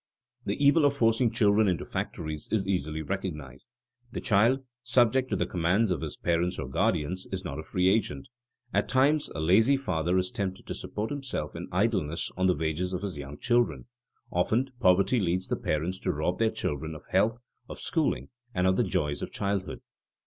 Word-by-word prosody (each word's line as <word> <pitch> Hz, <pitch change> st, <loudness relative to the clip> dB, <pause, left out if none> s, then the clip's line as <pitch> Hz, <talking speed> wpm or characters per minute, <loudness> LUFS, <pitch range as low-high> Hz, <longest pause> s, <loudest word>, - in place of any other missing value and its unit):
The -, -, 0 dB
evil 145 Hz, +3 st, +6 dB
of 140 Hz, 0 st, +2 dB
forcing 115 Hz, 0 st, +3 dB
children 110 Hz, -1 st, +3 dB
into 90 Hz, -3 st, 0 dB
factories 80 Hz, -2 st, -4 dB
is 105 Hz, -3 st, +1 dB
easily 80 Hz, -5 st, -1 dB
recognized. 75 Hz, -8 st, -5 dB, 0.4 s
The -, -, -4 dB
child, 120 Hz, +4 st, +3 dB, 0.2 s
subject 125 Hz, +1 st, +3 dB
to -, -, 0 dB
the -, -, 0 dB
commands 90 Hz, +5 st, +1 dB
of 90 Hz, -, -1 dB
his 80 Hz, -2 st, -5 dB
parents 85 Hz, +2 st, 0 dB
or -, -, -4 dB
guardians, 75 Hz, +7 st, 0 dB
is 95 Hz, 0 st, -4 dB
not 75 Hz, -4 st, -4 dB
a -, -, -5 dB
free 90 Hz, +3 st, +1 dB
agent. 95 Hz, -9 st, +1 dB, 0.5 s
At -, -, +1 dB
times 145 Hz, +4 st, +3 dB
a -, -, -3 dB
lazy 110 Hz, -, +4 dB
father 90 Hz, -8 st, 0 dB
is 90 Hz, 0 st, 0 dB
tempted 95 Hz, -2 st, -4 dB
to -, -, -4 dB
support 105 Hz, +4 st, -4 dB
himself 135 Hz, -, -4 dB
in 85 Hz, +2 st, -6 dB
idleness 90 Hz, -5 st, 0 dB
on 95 Hz, +1 st, +2 dB
the 90 Hz, -, +3 dB
wages 80 Hz, +4 st, -1 dB
of 90 Hz, +2 st, -3 dB
his 95 Hz, -7 st, -4 dB
young 70 Hz, +1 st, -7 dB
children. 120 Hz, -1 st, +1 dB, 0.5 s
Often 115 Hz, +9 st, +1 dB
poverty 95 Hz, +4 st, +4 dB
leads 90 Hz, -1 st, 0 dB
the -, -, +1 dB
parents 85 Hz, +5 st, -2 dB
to 90 Hz, -, -1 dB
rob 85 Hz, +3 st, -1 dB
their 115 Hz, -1 st, +3 dB
children 80 Hz, -4 st, -3 dB
of 75 Hz, -, -11 dB
health, 105 Hz, +5 st, +3 dB, 0.3 s
of -, -, -7 dB
schooling, 160 Hz, -3 st, -1 dB, 0.3 s
and 90 Hz, 0 st, +2 dB
of 95 Hz, 0 st, +3 dB
the -, -, +3 dB
joys 75 Hz, -1 st, -1 dB
of -, -, -5 dB
childhood. 100 Hz, -2 st, -2 dB
95 Hz, 190 wpm, -28 LUFS, 80-115 Hz, 0.5 s, evil